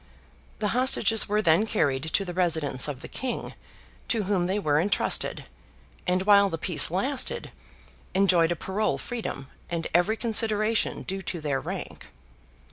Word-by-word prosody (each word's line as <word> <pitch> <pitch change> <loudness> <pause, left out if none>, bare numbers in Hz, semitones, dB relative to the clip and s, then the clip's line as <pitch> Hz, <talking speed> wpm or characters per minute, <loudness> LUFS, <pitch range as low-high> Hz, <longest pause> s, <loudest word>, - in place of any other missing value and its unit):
The 210 - -1
hostages 225 -3 +3
were 210 +1 +1
then 170 +6 +3
carried 140 -11 0
to 195 - +1
the 180 - -6
residence 160 -8 +1
of 135 -3 -6
the - - -8
King, 255 -2 -5 0.5
to 225 -3 0
whom 185 -3 0
they 190 +2 -1
were 150 -6 +1
entrusted, 200 +3 0 0.6
and 180 +1 +1
while 200 0 +5
the 165 - -4
peace 160 -2 +2
lasted, 255 - -1 0.6
enjoyed 180 -4 +4
a - - 0
parole 190 +5 -1
freedom, 225 - -5 0.2
and 170 -1 -3
every 175 +6 +2
consideration 220 -1 +1
due 195 0 -5
to 180 -2 -5
their 145 -3 -1
rank. - - -7
190 Hz, 150 wpm, -26 LUFS, 165-215 Hz, 0.6 s, while